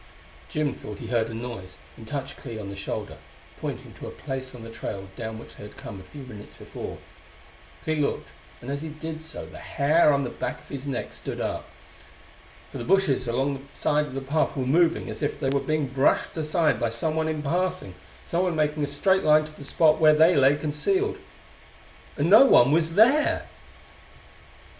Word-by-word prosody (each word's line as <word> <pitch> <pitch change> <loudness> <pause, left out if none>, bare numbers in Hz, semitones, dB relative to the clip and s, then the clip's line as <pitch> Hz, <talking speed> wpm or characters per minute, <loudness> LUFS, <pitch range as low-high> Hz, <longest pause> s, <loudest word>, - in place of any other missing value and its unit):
Jim 150 -2 0
thought 105 -1 -8
he - - -8
heard 115 -2 +1
a - - -6
noise, 115 -6 -7 0.2
and 110 - -12
touched 140 0 -4
Clee 115 -4 -8
on 100 -2 -6
the 100 - -6
shoulder, 100 -4 -5 0.4
pointing - - -5
to - - -9
a - - -4
place 130 -1 -6
on 120 - -9
the 115 - -8
trail 100 -3 -6
down 110 -2 -5
which 115 - -11
they - - -11
had 105 - -11
come 100 - -8
a - - -11
few 145 - -8
minutes 105 -5 -11
before. - - -7 0.9
Clee 155 0 0
looked, 145 -1 -1 0.3
and 125 - -6
as 140 0 -3
he 160 - -5
did 155 +1 -6
so 160 +1 -7
the - - -11
hair 155 +2 +3
on 140 -1 +2
the 125 - -3
back - - -4
of - - -20
his 140 0 -6
neck 135 - -3
stood - - -6
up. - - -3 1.0
For - - -6
the - - -4
bushes 165 -7 +2
along 135 +4 +1 0.2
the - - -18
side 150 0 +2
of 130 - -9
the 135 - -2
path 145 +2 0
were 130 - 0
moving 165 +5 +3
as - - -6
if 145 - -1
they 135 - 0
were 140 - +2
being 155 +2 0
brushed 135 +1 +1
aside 160 +1 +1
by 120 - +1
someone 155 +7 -1
in 155 -1 -2
passing 175 - -1 0.3
someone 175 0 0
making 150 -1 +1
a - - 0
straight 190 +6 +2
line 155 0 +5
to 155 - -10
the 155 - -11
spot 155 +2 +3
where 155 -1 +7
they 160 +3 +6
lay 140 +1 +5
concealed. 160 - 0 1.0
And 145 +2 +2
no 215 +9 +9
one 135 - +6
was 165 +1 +2
there! 265 +8 +4
145 Hz, 205 wpm, -26 LUFS, 125-160 Hz, 1.0 s, no